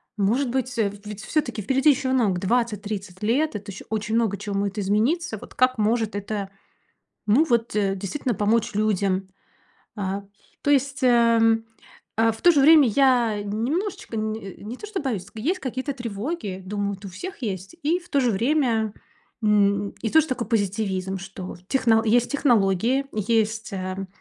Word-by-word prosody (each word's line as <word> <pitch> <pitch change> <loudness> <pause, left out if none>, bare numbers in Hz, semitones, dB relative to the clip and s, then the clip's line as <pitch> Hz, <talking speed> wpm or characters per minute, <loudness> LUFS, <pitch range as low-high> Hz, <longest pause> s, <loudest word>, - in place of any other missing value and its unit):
может 230 +6 +1
быть, 255 0 -2
э, 215 -3 +2 0.2
ведь 210 0 -7
всё-таки 255 -8 -1
впереди 270 +8 +3
ещё 270 -2 +2
много 210 -8 +2
20-30 205 -3 -2
лет. 250 +7 +1
Это 205 0 -6
ещё 195 - -10
очень 215 0 -2
много 220 -4 +1
чего 205 -1 -5
моет 200 +1 -1
измениться. 220 - 0
Вот - - -12
как 255 0 +3
может 220 0 +1
это 200 -1 -3 0.8
ну 230 +9 +5
вот 235 -6 +1
действительно 200 +5 -1
помочь 215 +2 +1
людям? 195 -3 0 0.7
А 200 -1 -3 0.4
то - - -1
есть, 275 0 +1
ам, 230 -2 +4 0.5
а, 225 0 +4
в 220 - -11
то 350 - +8
же 290 -4 +3
время 300 -2 +7
я 240 -3 +3
немножечко 235 - -3
не 215 -3 -4
не 225 +5 -6
то - - -8
что 420 -2 -4
боюсь, 225 -10 -2
есть 305 - -1
какие-то 260 +1 -3
тревоги, 230 - -4
думаю, 205 +1 -2
вот 195 +1 -10
у - - -6
всех 280 - -8
есть. 195 - -4
И 325 +5 +1
в 350 - -19
то 280 - +2
же 250 -3 +2
время, 230 -1 +1 0.5
м, 200 -1 +3
и 225 - -1
тоже 320 +3 +4
такой 250 -4 -3
позитивизм, 195 -3 -1
что 185 0 -8
техно 230 -3 +3
есть 235 +2 +3
технологии, 240 -1 +2
есть, 220 +1 0
эм, 190 0 -4
220 Hz, 165 wpm, -24 LUFS, 200-260 Hz, 0.8 s, то